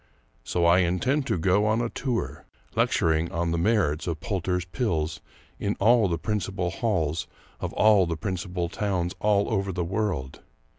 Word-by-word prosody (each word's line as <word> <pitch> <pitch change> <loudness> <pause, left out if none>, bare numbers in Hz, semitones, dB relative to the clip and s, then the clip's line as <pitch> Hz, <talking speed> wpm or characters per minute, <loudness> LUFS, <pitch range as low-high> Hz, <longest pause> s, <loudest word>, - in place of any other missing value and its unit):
So 85 -1 0
I 85 +2 +6
intend 125 - +1
to - - +1
go 95 +5 +2
on 110 +1 +2
a 120 - 0
tour, 120 0 -3 0.3
lecturing 80 +1 +2
on 85 0 -1
the 85 - 0
merits 90 -6 +1
of 80 -3 -2
Poulter's 90 -1 -2
Pills 85 - -2 0.4
in 100 +1 -1
all 115 +1 +4
the 85 -2 -1
principal 95 -2 -2
halls 85 -8 -1 0.3
of - - -3
all 105 -4 +5
the 85 -1 -2
principal 90 -1 -3
towns 90 -1 -2
all 105 -1 +2
over 100 -2 0
the 90 -1 -2
world. 90 -8 -2
90 Hz, 160 wpm, -26 LUFS, 85-105 Hz, 0.4 s, I